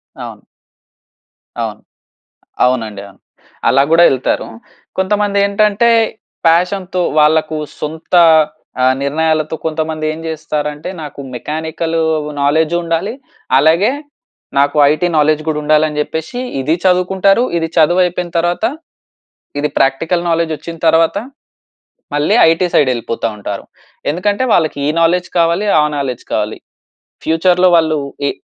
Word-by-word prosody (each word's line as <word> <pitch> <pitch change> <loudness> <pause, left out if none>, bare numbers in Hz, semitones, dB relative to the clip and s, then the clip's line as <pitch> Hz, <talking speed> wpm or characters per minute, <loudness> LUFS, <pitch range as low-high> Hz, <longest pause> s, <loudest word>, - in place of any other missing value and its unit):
అవును. - - -9 1.2
అవును. - - -5 0.8
అవునండి, 110 -5 -1
అవును. 100 - -21 0.5
అలా 135 - +4
కూడా 165 +1 +6
ఎళ్తారు. 130 -1 -1 0.5
కొంతమంది 200 +1 0
ఏంటంటే, 210 +3 +2 0.6
ప్యాషన్ 180 +3 +1 0.3
వాళ్ళకు 155 +1 +2 0.2
సొంత 160 +3 -4 0.7
ఆ! - - +5 0.2
నిర్ణయాలతో 155 +2 0
కొంతమంది 155 0 -2
ఏం 155 - -7
చేస్తారంటే, 150 0 -4
నాకు 145 -2 -9
మెకానికల్ 160 +5 -3 0.4
నాలెడ్జ్ 155 +3 +2
ఉండాలి. 170 +6 -2 0.4
అలాగే 165 - +3 0.7
నాకు 145 +1 +2
ఐటీ 165 +4 0
నాలెడ్జ్ 155 0 +2
కూడా 150 -1 -1
ఉండాలి 155 +1 +3
అని 150 0 -4
చెప్పేసి, 160 +10 -5 0.2
ఇది 155 +5 +1
చదువుకుంటారు. 190 +4 +3
ఇది 165 -1 -1
చదువు 175 +3 +4
అయిపోయిన 180 0 -3
తర్వాత 175 +5 0 0.9
ఇది 150 +1 0
ప్రాక్టికల్ 160 +6 +1
నాలెడ్జ్ 165 -1 0
వచ్చిన 165 +3 -9
తర్వాత, 160 0 +3 1.0
మళ్ళీ 145 +1 +2
ఐటీ 165 +2 +1
సైడ్ 140 - +4
వెళ్ళిపోతా 115 -1 -3
ఉంటారు. 100 -1 -6 0.5
ఎందుకంటే 205 +8 -1
వాళ్ళకి, 160 -4 +1
ఈ - - +2
నాలెడ్జ్ 175 +2 +1
కావాలి. 170 +5 +1
ఆ - - +3
నాలెడ్జ్ 130 -4 -3
కావాలి. 105 0 -2 0.7
ఫ్యూచర్‌లో 180 +3 +3
వాళ్ళు 160 -2 +2 0.3
ఏ - - 0
160 Hz, 120 wpm, -15 LUFS, 150-175 Hz, 1.2 s, కూడా